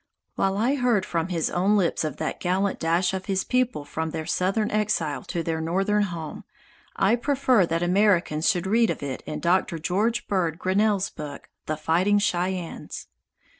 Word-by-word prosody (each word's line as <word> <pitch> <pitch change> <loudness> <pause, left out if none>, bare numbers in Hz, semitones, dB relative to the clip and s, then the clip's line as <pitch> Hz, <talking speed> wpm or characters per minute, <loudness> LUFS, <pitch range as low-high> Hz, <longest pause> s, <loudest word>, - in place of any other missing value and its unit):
While 195 0 0
I 235 +6 +2
heard 245 -6 +2
from 165 0 -1
his 170 -4 -1
own 195 +4 +2
lips 175 -5 +1
of 150 -2 -3
that - - -3
gallant 190 +2 0
dash 170 +3 +1
of 190 0 -4
his 190 -1 0
people 250 - 0
from 160 +2 -3
their 160 0 -4
southern 195 +6 0
exile 205 -9 0
to 170 - -3
their 160 0 -2
northern 195 +5 +1
home, 165 -5 -6 0.5
I 195 +4 +3
prefer 255 - +2
that 165 +1 -1
Americans 180 -4 +2
should 180 -4 0
read 225 +4 +3
of - - -3
it 135 -2 -4
in - - -4
Doctor 175 -1 +1
George 205 +9 0
Bird 170 -5 0
Grinnell's 200 +2 +1
book, 145 -2 -8 0.2
"The 155 - -1
Fighting 175 +6 +2
Cheyennes." 180 -3 -2
185 Hz, 170 wpm, -25 LUFS, 165-205 Hz, 0.5 s, I